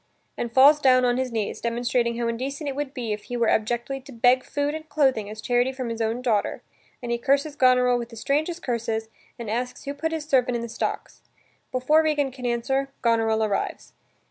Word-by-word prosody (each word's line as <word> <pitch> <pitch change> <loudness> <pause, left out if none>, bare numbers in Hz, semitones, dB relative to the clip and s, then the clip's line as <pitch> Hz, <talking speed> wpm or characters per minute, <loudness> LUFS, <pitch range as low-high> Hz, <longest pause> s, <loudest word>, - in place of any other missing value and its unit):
and 235 - -4
falls 280 +5 +7
down 255 -2 +5
on 245 0 +2
his 260 -1 -1
knees 220 -3 -3
demonstrating 235 0 0
how 235 -1 -1
indecent 270 +6 -3
it 275 - -3
would 290 -1 -3
be 240 -6 -3
if 210 - -7
he 245 - -4
were 235 -1 +2
abjectly 240 +5 0
to 275 +2 -13
beg 245 +1 +3
food 290 0 -2
and 315 0 -7
clothing 265 -8 +1
as 215 0 -8
charity 245 +2 +1
from 260 -2 -5
his 230 0 -4
own 225 +3 -1
daughter, 220 -5 0 0.4
and 240 - -3
he 235 - 0
curses 280 +4 +1
Goneril 250 -2 +4
with 235 -1 -6
the 230 - -11
strangest 310 +9 -1
curses 225 -2 -2 0.3
and 235 -2 -7
asks 245 +4 -3
who 280 - -4
put 320 +3 -3
his 320 -2 -3
servant 255 -4 +2
in 235 - -2
the 235 - -6
stocks. - - -4 0.5
Before 255 +5 +3
Regan 295 -3 +1
can 255 -1 -5
answer, 265 +3 0
Goneril 225 -2 +2
arrives. 205 -2 -3
250 Hz, 210 wpm, -25 LUFS, 235-275 Hz, 0.5 s, falls